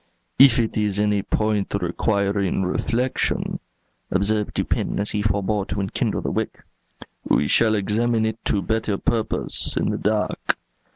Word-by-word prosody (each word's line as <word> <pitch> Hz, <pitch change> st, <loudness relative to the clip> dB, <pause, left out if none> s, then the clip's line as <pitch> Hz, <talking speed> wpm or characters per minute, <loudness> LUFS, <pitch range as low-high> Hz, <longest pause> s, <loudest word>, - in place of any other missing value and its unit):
"If 135 Hz, 0 st, +8 dB
it 115 Hz, -2 st, 0 dB
is 105 Hz, -2 st, 0 dB
any 105 Hz, -1 st, +2 dB
point 105 Hz, -1 st, -1 dB
requiring 100 Hz, +1 st, 0 dB
reflection," 120 Hz, +7 st, -1 dB, 0.5 s
observed 105 Hz, +2 st, 0 dB
Dupin, -, -, -1 dB
as 100 Hz, -, 0 dB
he 105 Hz, -, -1 dB
forbore 100 Hz, 0 st, 0 dB
to 95 Hz, -, -4 dB
enkindle 95 Hz, -1 st, -1 dB
the -, -, -2 dB
wick, -, -, -3 dB, 0.6 s
"we 75 Hz, -, +2 dB
shall 110 Hz, +5 st, +3 dB
examine 110 Hz, +3 st, +1 dB
it 110 Hz, 0 st, -3 dB
to 100 Hz, -, +1 dB
better 110 Hz, +1 st, -1 dB
purpose 110 Hz, +1 st, 0 dB
in -, -, +1 dB
the -, -, -3 dB
dark." 105 Hz, 0 st, 0 dB
105 Hz, 140 wpm, -23 LUFS, 100-110 Hz, 0.6 s, If